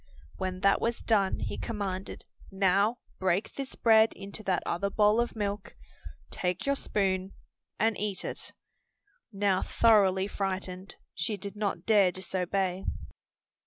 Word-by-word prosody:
When 185 -1 -3
that 195 +1 +4
was 235 0 -1
done, 200 -4 +2
he - - -3
commanded, 195 -4 -4 0.3
"Now 200 +4 +2 0.2
break 185 +2 0
this 275 -1 -6
bread 220 -1 +5
into 200 +2 -9
that 185 -2 +1
other 200 +4 -1
bowl 210 +3 +4
of 240 - -3
milk, 205 -1 -3 0.6
take 180 -1 -2
your 280 - +3
spoon 195 -7 -1 0.5
and 225 0 +2
eat 200 -2 -2
it." - - -5 0.8
Now 195 -2 +1
thoroughly 195 -4 +4
frightened, 190 -1 -4 0.2
she 185 +6 -2
did 200 +1 -6
not 200 -4 -2
dare 205 -4 +5
disobey. 185 0 -2
195 Hz, 130 wpm, -29 LUFS, 185-210 Hz, 0.8 s, bread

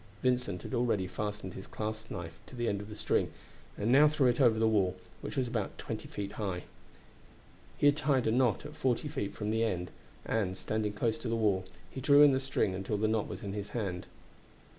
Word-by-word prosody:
Vincent 125 -8 +1
had - - -7
already 120 -6 +1
fastened 105 0 -4
his 95 - -8
clasp 110 0 -4
knife 85 -3 -6
to - - -11
the 120 -1 -1
end 100 -2 0
of 105 - -9
the 105 - -7
string, - - +1 0.5
and 105 - -3
he 115 - +3
now 145 +3 +8
threw 150 -2 +2
it 125 +2 +3
over 115 -4 +5
the 110 0 +3
wall, 95 -4 +2 0.3
which - - -5
was 130 -2 +1
about 115 -4 -3
twenty - - -5
feet 100 -1 -5
high. 100 -4 -3 1.1
He - - +1
had 145 +1 +6
tied 140 -5 +2
a 110 - +3
knot 125 -1 +2
at 150 +1 -8
forty 130 +2 0
feet 100 -8 -3
from 105 0 -2
the 110 +1 +2
end, 90 -6 -1 0.3
and, 95 -4 0
standing 105 +1 -1
close 115 +1 0
to 115 - -5
the 115 - 0
wall, 100 -4 +2 0.3
he 130 - -6
drew 145 +2 +7
in 145 - +8
the 130 - +2
string 135 -7 0
until 95 +2 -2
the 110 +1 +2
knot 110 -1 +1
was - - -7
in 100 -1 -4
his 100 -1 -4
hand. 95 -5 -3
110 Hz, 225 wpm, -32 LUFS, 100-125 Hz, 1.1 s, now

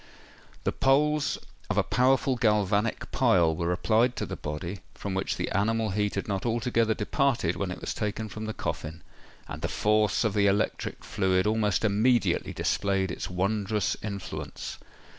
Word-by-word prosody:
The - - +1
poles 150 +2 +2 0.3
of - - -1
a - - +4
powerful 130 +3 +2
galvanic 105 -1 +1
pile 85 -3 +3
were 85 +2 -1
applied 115 +6 +2
to - - -2
the - - -5
body, 85 +6 -5 0.2
from 100 - -4
which 95 +1 -1
the - - -2
animal 110 +2 +1
heat 105 +1 0
had 100 - -3
not 100 -2 -2
altogether 115 -1 +1
departed 110 - +1
when 95 +2 -2
it 90 - -5
was - - -3
taken 105 +1 -3
from 110 +1 -6
the 110 - -3
coffin; 80 +2 -4 0.4
and 75 - -7
the 80 - 0
force 105 +4 +2
of 110 -3 +1
the 100 -1 +3
electric 100 +2 -1
fluid 95 -1 +1
almost 105 -1 +1
immediately 110 +4 +2
displayed 95 -2 0
its - - -5
wondrous 100 +2 0
influence. 100 -2 -6
105 Hz, 160 wpm, -28 LUFS, 95-115 Hz, 0.4 s, a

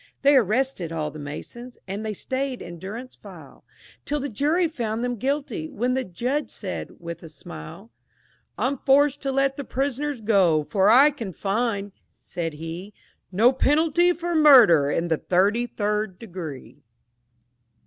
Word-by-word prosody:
They 285 +1 +6
arrested 235 -6 +1
all 155 -2 -3
the 155 - -10
Masons, 235 +12 -8
and 200 +3 -4
they 215 -1 -3
stayed 260 +3 -3
in 170 -1 -9
durance 225 +8 -8
vile - - -14 0.4
Till 295 +1 -2
the 285 +1 -3
jury 305 - +1
found 235 -7 -3
them 245 0 -1
guilty, 285 - -3
when 250 -2 -1
the 260 0 0
Judge 250 - -2
said, - - -6
with 170 -1 -7
a 165 - -10
smile, 175 +6 -11 0.7
"I'm 270 +1 -1
forced 285 +1 +3
to 275 - -2
let 275 0 +1
the 285 - -4
prisoners 275 +1 -2
go, 190 -8 +3
for 195 +5 +2
I 270 +6 +7
can 230 -10 -7
find," 205 +1 -2 0.3
said 165 -2 -5
he, 165 +6 -8 0.4
"No 225 +7 +4
penalty 320 +6 +3
for 345 0 -3
murder 245 - +7
in 165 +3 0
the 160 -2 +1
thirty 200 +9 +1
third 210 -3 -2
degree!" 170 - -9
230 Hz, 155 wpm, -24 LUFS, 180-275 Hz, 0.7 s, I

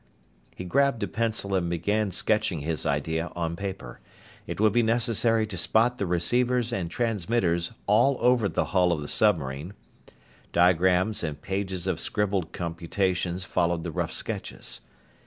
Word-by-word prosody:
He 90 - -6
grabbed 140 +3 +2
a - - 0
pencil 110 -3 -1
and 90 -3 +1
began 100 +5 0
sketching 100 -3 0
his 80 +1 -2
idea 80 +4 -1
on 85 -1 -2
paper. 95 -10 -6 0.5
It - - -5
would 105 -1 +4
be 120 - +4
necessary 115 -1 +2
to 100 -5 -6
spot 115 +7 +2
the 100 - -1
receivers 120 +7 +1
and 90 -7 -2
transmitters 95 -5 0
all 120 +6 +4
over 120 -4 +3
the - - 0
hull 90 -2 +4
of 80 -3 -1
the 75 - -5
submarine. 80 -3 0 0.8
Diagrams 90 +4 +3
and 75 -3 -3
pages 95 -2 -3
of 95 -4 -1
scribbled 100 -5 -1
computations 90 +1 -2
followed 85 -3 0
the 85 - -4
rough - - -2
sketches. - - -6
95 Hz, 150 wpm, -26 LUFS, 85-110 Hz, 0.8 s, would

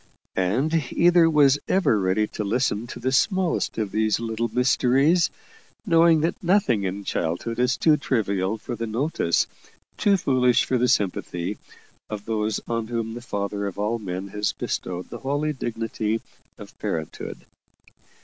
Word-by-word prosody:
And 135 - +1
either 175 -1 +5
was 145 -2 +4
ever 185 - +3
ready 95 +3 +1
to 105 - -4
listen 115 +1 0
to - - -8
the 130 +2 -1
smallest 185 +5 +1
of 105 -3 -2
these 110 0 +1
little 115 0 -2
mysteries, 135 +7 +3 0.6
knowing 165 -1 +5
that 165 +2 -1
nothing 170 - +2
in 95 +2 -3
childhood 90 +8 -2
is 125 0 +2
too 155 -2 +4
trivial 100 -6 0
for 120 +3 -6
the 115 0 -4
notice, 115 - +1 0.5
too 200 -1 +3
foolish 125 -6 +3
for 130 - 0
the 125 - +3
sympathy, 95 -2 -1 0.5
of 105 -1 -6
those 110 -1 -1
on 115 -1 -2
whom 115 -1 -3
the 120 - -7
Father 100 -3 -3
of 100 - -6
all 105 +3 -1
men 95 -1 -5
has 105 +1 -1
bestowed 90 0 -4
the 120 - -6
holy 145 +3 -1
dignity 115 -3 -2 0.4
of - - -12
parenthood. 80 -1 -5
115 Hz, 150 wpm, -24 LUFS, 105-140 Hz, 0.6 s, either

